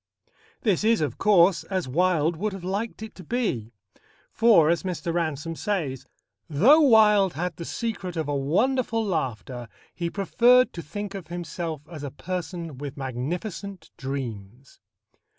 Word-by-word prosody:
This 205 -4 +1
is, 225 0 +4
of 145 -6 -2
course, 190 -3 +4
as 185 -6 -2
Wilde 165 +2 +2
would 205 +5 -2
have 195 -2 -8
liked 205 +4 -3
it 220 - -8
to 185 - -12
be. 155 - -2 0.6
For, 210 -9 +5
as 170 - +1
Mr. 180 -2 -3
Ransome 165 -1 -2
says, 155 - -3 0.4
"though 220 - +6
Wilde 210 - +5
had 175 0 -3
the 170 - -6
secret 200 -6 -4
of 160 -2 -1
a 145 - -1
wonderful 225 - +1
laughter, 130 - -3 0.3
he 170 -1 -3
preferred 240 +7 +4
to 170 - -6
think 205 +6 -6
of 195 -4 -7
himself 165 -3 -5
as 155 -4 -9
a 145 - -4
person 170 -1 -5
with 145 0 -6
magnificent 170 - -5
dreams." 130 - -6
175 Hz, 150 wpm, -25 LUFS, 145-205 Hz, 0.6 s, though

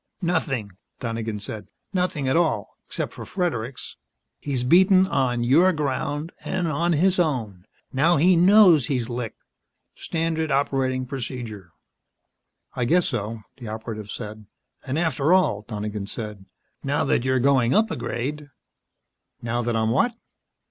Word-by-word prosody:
"Nothing," 135 - -1 0.3
Donegan 115 -2 -3
said. 105 +1 -7 0.3
"Nothing 180 -7 0
at 130 - +2
all 160 - 0
except - - -3
for - - -8
Fredericks. 140 - -3 0.4
He's 135 -4 -2
been 125 - -2
beaten 185 +2 +6
on 130 -8 0
your 160 +10 +5
ground, 145 +1 -2
and 180 -2 -1
on 170 +3 +1
his 185 +4 +3
own. 110 - -1 0.3
Now 155 +6 +3
he 180 +5 +5
knows 180 - +6
he's 125 -4 -1
licked. 120 -2 -5 0.5
Standard 160 -1 -2
operating 135 -2 0
procedure." 120 -7 -6 1.1
"I 125 - 0
guess 175 +7 +3
so," 110 +2 -3 0.2
the 120 - -8
Operative 110 -1 -6
said. 105 -2 -7 0.4
"And 135 +2 -3
after 160 -1 +2
all," 105 - +2
Donegan 105 -2 -4
said, 105 -3 -6 0.4
"now 140 +1 0
that 130 - +1
you're 130 0 +2
going 130 -1 +3
up 220 +2 +3
a - - -1
grade 145 +5 -4 0.5
" - - -52
"Now 120 +1 -1
that 120 -1 -1
I'm 110 0 +1
what?" 235 - +2
130 Hz, 145 wpm, -24 LUFS, 115-165 Hz, 1.1 s, beaten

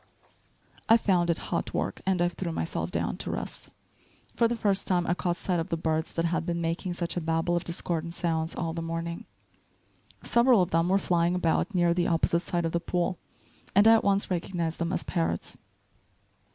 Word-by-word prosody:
I 225 - +8
found 180 -6 +1
it 170 - +2 0.2
hot - - -2
work, - - -2
and 185 -2 +2
I - - +3
threw 175 0 -4
myself 165 - -2
down - - -2
to - - -5
rest. - - -5 0.7
For 230 - +4
the 240 - -1
first 200 -4 0
time 175 -2 +2
I 175 - +1
caught 175 -1 -1
sight 180 -1 -1
of 165 +3 -3
the 165 - -1
birds 160 0 -1
that 165 - +1
had 165 0 0
been 170 0 -2
making 170 +2 -2
such 175 -1 -3
a 175 - -1
babel 165 +2 0
of 175 - -1
discordant 170 -1 -3
sounds 165 -1 -1
all 165 -2 -2
the 165 - -4
morning. 165 +1 -4 1.0
Several 235 -4 +4
of 180 - -4
them 165 +2 +2
were 195 - +4
flying 175 -2 +1
about 180 +4 0
near 175 -1 +3
the 175 0 +1
opposite 170 0 +2
side 175 -1 -2
of 165 - -1
the 170 - 0
pool, 175 +1 -1 0.6
and 205 +3 +6
I 225 - +9
at 225 - +4
once 200 -1 +1
recognized 170 -2 -2
them 170 0 -1
as 185 - -1
parrots. 170 -3 -2
175 Hz, 205 wpm, -28 LUFS, 165-185 Hz, 1.0 s, I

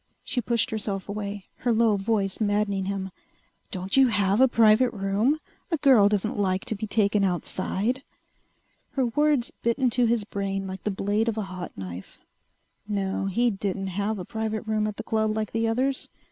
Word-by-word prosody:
She 245 - -1
pushed 235 0 0
herself 205 -3 -3
away, 205 -1 -5
her 245 - 0
low 225 -1 +4
voice 195 -1 0
maddening 205 -2 +1
him. 195 -1 -3 0.6
"Don't 190 -2 -3
you 270 -1 +6
have 205 -1 +2
a 265 - +8
private 230 +1 +5
room? 210 +8 0 0.3
A 330 - +1
girl 255 -9 +6
doesn't 210 0 -1
like 190 -1 0
to 220 - -1
be 215 +2 -4
taken 205 -1 +2
outside...." 195 +6 -1 0.9
Her 265 -2 +1
words 290 0 +1
bit 235 +1 +1
into 250 -2 +3
his 230 -2 +1
brain 195 -1 -3
like 190 -1 -7
the - - +1
blade 205 +3 0
of 225 - -3
a 215 - -1
hot 180 -1 -7
knife. 90 -1 -8 0.7
No, 195 -2 -1
he 235 +5 +2
didn't 195 -1 -3
have 205 +3 -1
a 180 - -6
private 220 +1 -3
room 215 -1 0
at 210 - -5
the 225 - -5
club 220 -1 0
like 215 -1 -2
the 225 0 0
others. 260 +4 0
210 Hz, 180 wpm, -26 LUFS, 195-230 Hz, 0.9 s, a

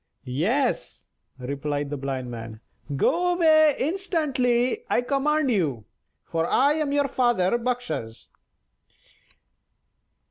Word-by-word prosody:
"Yes," 205 - -1 0.3
replied 140 +2 -3
the - - -2
Blind 130 -2 -4
Man; 115 -2 -8 0.4
"go 355 - +2
away 310 -3 +5
instantly, 295 - 0
I - - +2
command 280 +2 +1
you, 145 - -1 0.4
for 165 0 -1
I 280 +3 +3
am 305 -2 -1
your 285 0 +2
father 240 -7 +1
Bakshas." 245 - -4
245 Hz, 100 wpm, -25 LUFS, -, 0.4 s, away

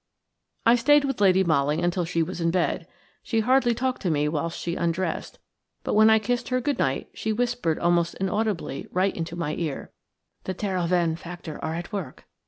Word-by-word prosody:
I 230 +1 +7
stayed 290 +4 +4
with 270 -6 -2
Lady 190 -1 +5
Molly 150 -2 +2
until 175 0 0
she 165 0 0
was 175 +1 -5
in 165 - +2
bed. 175 0 0 0.3
She 225 -2 0
hardly 245 0 +3
talked 260 +2 -1
to 185 - 0
me 150 -2 +1
whilst 160 +2 -2
she 170 0 -3
undressed, 170 +2 -2 0.5
but - - -2
when 220 +1 +6
I 220 - +6
kissed 240 +3 -1
her 255 0 +1
"good 285 +2 -1
night" 135 0 -1
she 220 - -2
whispered 240 -8 0
almost 170 -1 +1
inaudibly 195 -6 -2
right 190 +2 +1
into 165 0 -4
my 160 -3 -2
ear: 155 -5 -4 0.5
"The 185 - -3
Terhoven 175 -4 0
faction 170 -2 -8
are 160 - -3
at 175 +5 -6
work. 180 -11 -5
180 Hz, 190 wpm, -25 LUFS, 165-220 Hz, 0.5 s, I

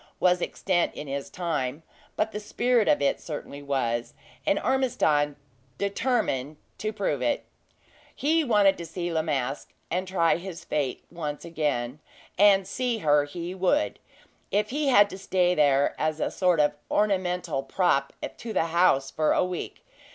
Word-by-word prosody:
was 180 0 +3
extant 175 -1 0
in - - -6
his 140 0 -4
time; 155 -5 -3 0.3
but 220 +1 0
the 210 - -4
spirit 235 +2 +1
of 145 - +3
it 140 - +1
certainly 145 -2 -7
was, 120 -4 -2 0.3
and 200 - +3
Ormiston 155 - +1 0.4
determined 200 - -1 0.2
to 215 - -2
prove 195 - -2
it. 120 - 0 0.7
He 320 +3 +2
wanted 205 -7 +4
to 170 - -5
see 175 +1 -4
La 160 - +2
Masque, 140 -4 -3 0.2
and 185 +2 -1
try 170 -4 +2
his 175 -1 -8
fate 140 -4 -2
once 150 -3 -5
again; 150 -5 -2 0.4
and 195 -1 +5
see 245 +2 -1
her 145 -6 +3
he 170 +4 -6
would, 190 +12 +1 0.5
if 210 +2 0
he 290 +1 0
had 205 -6 +6
to 190 - -7
stay 180 -2 +2
there 145 -3 +3
as 155 0 0
a - - -1
sort 180 -3 +2
of 150 0 +3 0.2
ornamental 180 -7 0
prop 140 -1 +1 0.3
to 230 -2 -6
the 175 - +2
house 140 -6 +3
for 155 -1 +2
a - - +2
week. 180 -2 -6
175 Hz, 160 wpm, -26 LUFS, 145-200 Hz, 0.7 s, had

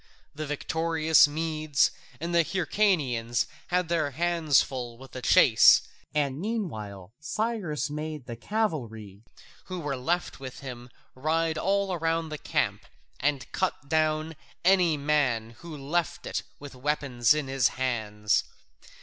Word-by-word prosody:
The 155 +1 -5
victorious 160 +1 +3
Medes 155 -1 +1 0.3
and 170 +3 -3
the 170 -1 +5
Hyrcanians 150 - +1 0.2
had 180 -1 +1
their 160 -3 +1
hands 165 0 +2
full 120 -3 -6
with 135 +1 -13
the 130 - -7
chase, 110 -2 +6 0.3
and 145 -1 -1
meanwhile 110 - -4
Cyrus 180 - -2
made 150 -2 -5
the 120 - -6
cavalry 115 - -3 0.4
who 185 -1 -5
were 145 -4 -2
left 170 +8 -2
with 130 -2 -8
him 125 -2 -8 0.2
ride 160 +4 0
all 195 0 +1
round 165 0 -1
the 150 - -5
camp - - -1 0.3
and 140 -4 -1
cut 185 -6 -2
down 155 0 +1 0.3
any 180 -4 +4
man 135 -6 +1
who 165 -3 -8
left 155 +5 -2
it - - -2 0.2
with 145 -1 -10
weapons 130 -2 +1
in 150 -3 -2
his 135 -3 +3
hands. 110 -5 0
150 Hz, 130 wpm, -27 LUFS, 130-165 Hz, 0.4 s, chase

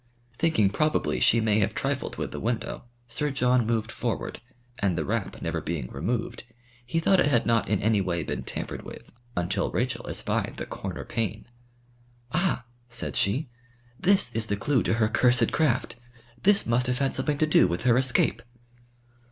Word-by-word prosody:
Thinking 135 -13 +3
probably 155 +8 +1
she 115 - +4
may 110 -1 +2
have 100 - 0
trifled - - -2
with - - -4
the - - -5
window, 115 +1 -3 0.2
Sir 135 +5 -1
John 125 -3 +2
moved 115 0 0
forward, 120 -2 -3 0.4
and 95 -4 +1
the 80 - -1
wrap - - -2
never - - -2
being 75 -7 -4
removed, 110 - -3 0.4
he 125 +7 -1
thought 190 +3 +3
it - - +4
had 125 -5 +2
not 115 -3 +2
in 105 -2 +2
any 110 -1 +3
way 85 -3 -1
been - - -3
tampered - - -5
with - - -11 0.3
until 90 0 0
Rachel - - -2
espied - - -1
the - - -4
corner - - -6
pane. 110 -1 -3 0.9
"Ah!" 175 -8 0 0.2
said 120 -1 -2
she, 125 +10 +1 0.5
"this 190 -9 +3
is 110 -1 -1
the 100 - -1
clue 135 +2 +1
to - - +1
her 110 -2 +2
cursed 125 +2 +3
craft. 130 -6 +1 0.4
This 200 0 +4
must 120 +2 +1
have 125 0 +1
had 135 0 0
something 145 +2 0
to 155 - +3
do 150 -11 +5
with 85 0 -2
her 120 -2 +4
escape." 125 -2 +2
120 Hz, 175 wpm, -27 LUFS, 105-135 Hz, 0.9 s, do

